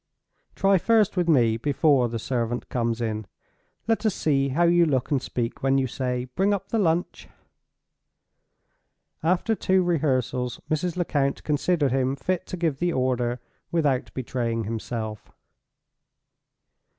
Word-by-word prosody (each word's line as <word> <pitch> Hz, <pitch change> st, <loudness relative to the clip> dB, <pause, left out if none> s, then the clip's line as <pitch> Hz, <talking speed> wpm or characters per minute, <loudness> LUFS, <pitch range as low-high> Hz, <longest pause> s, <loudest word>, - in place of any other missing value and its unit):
Try 195 Hz, -1 st, +3 dB
first 220 Hz, 0 st, +3 dB
with 175 Hz, -2 st, +1 dB
me 115 Hz, -7 st, +4 dB
before 140 Hz, -1 st, +2 dB
the 115 Hz, -, -3 dB
servant 120 Hz, 0 st, -2 dB
comes 115 Hz, -1 st, -1 dB
in. 110 Hz, -3 st, -3 dB, 0.6 s
Let 225 Hz, 0 st, +1 dB
us 215 Hz, -4 st, +1 dB
see 140 Hz, -3 st, +1 dB
how 155 Hz, +6 st, +1 dB
you 170 Hz, 0 st, +4 dB
look 130 Hz, -3 st, 0 dB
and 140 Hz, -3 st, +2 dB
speak 120 Hz, -2 st, -4 dB
when 135 Hz, 0 st, +2 dB
you 135 Hz, -, +2 dB
say, 125 Hz, 0 st, -2 dB
'Bring 195 Hz, +11 st, +1 dB
up 195 Hz, 0 st, -7 dB
the 225 Hz, -, 0 dB
lunch.'" 170 Hz, -2 st, 0 dB, 1.9 s
After 180 Hz, +7 st, +1 dB
two 190 Hz, -3 st, +2 dB
rehearsals, 130 Hz, -7 st, 0 dB
Mrs. 165 Hz, +3 st, -1 dB
Lecount 145 Hz, -6 st, 0 dB
considered 150 Hz, -1 st, +1 dB
him 130 Hz, +1 st, +1 dB
fit 180 Hz, +7 st, -2 dB
to 185 Hz, -, -5 dB
give 160 Hz, -5 st, -1 dB
the 175 Hz, 0 st, +1 dB
order, 125 Hz, -3 st, 0 dB, 0.3 s
without 145 Hz, -6 st, +1 dB
betraying 120 Hz, -3 st, -2 dB
himself. 110 Hz, 0 st, -5 dB
135 Hz, 140 wpm, -25 LUFS, 125-175 Hz, 1.9 s, me